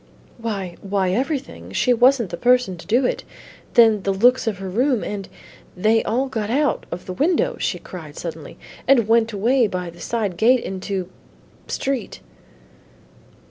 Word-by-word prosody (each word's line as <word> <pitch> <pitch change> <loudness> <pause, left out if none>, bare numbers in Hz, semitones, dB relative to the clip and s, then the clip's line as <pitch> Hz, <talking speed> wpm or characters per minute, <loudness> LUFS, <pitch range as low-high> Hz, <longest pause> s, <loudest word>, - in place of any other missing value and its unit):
"Why, 200 -6 -4
why, 195 -2 0
everything. 270 - -3
She 250 - +3
wasn't 245 -3 +3
the - - -2
person 245 -2 +2
to 170 - -13
do 245 +5 +3
it; - - -1 0.5
then 225 -4 +6
the 195 - 0
looks 245 +6 +3
of 215 -4 -1
her 195 0 -6
room, 245 +5 +1
and 200 -2 -5 0.5
They 220 +4 +3
all 255 +4 0
got 220 -5 -3
out 280 +1 0
of 175 +1 -6
the 185 - -5
window," 320 - +1
she - - -1
cried - - -10
suddenly, - - -7 0.3
"and 240 -6 +4
went 230 0 +3
away 230 +4 +2
by 180 -3 -4
the 170 0 -15
side 205 -3 -2
gate 245 +4 +4
into 190 -1 -4 0.6
Street." 270 -2 -3
225 Hz, 160 wpm, -21 LUFS, 195-250 Hz, 0.6 s, then